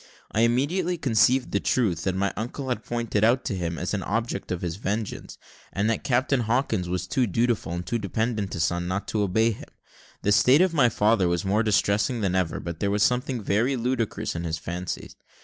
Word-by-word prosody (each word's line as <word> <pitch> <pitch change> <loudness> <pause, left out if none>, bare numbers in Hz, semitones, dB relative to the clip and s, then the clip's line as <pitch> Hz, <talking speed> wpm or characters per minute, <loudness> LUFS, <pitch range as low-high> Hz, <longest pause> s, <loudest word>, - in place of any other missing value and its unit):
I 110 - +1
immediately 155 +10 +1
conceived 125 -1 +2
the 100 - +1
truth, 95 -11 0
that 95 -1 0
my 100 +1 0
uncle 125 +5 -5
had 125 - -2
pointed 120 -3 -1
me 110 - +6
out 125 +3 +2
to 100 - -2
him 85 -2 -3
as 90 +2 -3
an 100 - -1
object 110 +1 -3
of 90 -1 -3
his 85 0 -3
vengeance, 105 +1 -4 0.3
and 100 +2 0
that 115 - -2
Captain 130 +1 +1
Hawkins 115 -5 0
was 90 0 -2
too 125 +6 +1
dutiful, 115 -4 0
and 85 +1 -4
too 120 - -1
dependent 110 0 -2
a - - -5
son, 85 +2 0
not 95 +2 -3
to 110 - 0
obey 110 +4 +2
him. 105 - -9 0.5
The 105 - +2
state 130 - +5
of 185 -2 +3
my 135 -7 +4
father 105 -3 +2
was 85 +2 -1
more 100 +3 +2
distressing 105 +2 +1
than 95 -3 0
ever, 90 -3 0
but 85 -1 -6
there 100 - 0
was 105 +1 +2
something 125 -2 0
very 115 +8 +1
ludicrous 120 -5 -2
in 85 - -3
his 80 -1 -2
fancies. 90 +2 -5
105 Hz, 215 wpm, -25 LUFS, 95-120 Hz, 0.5 s, me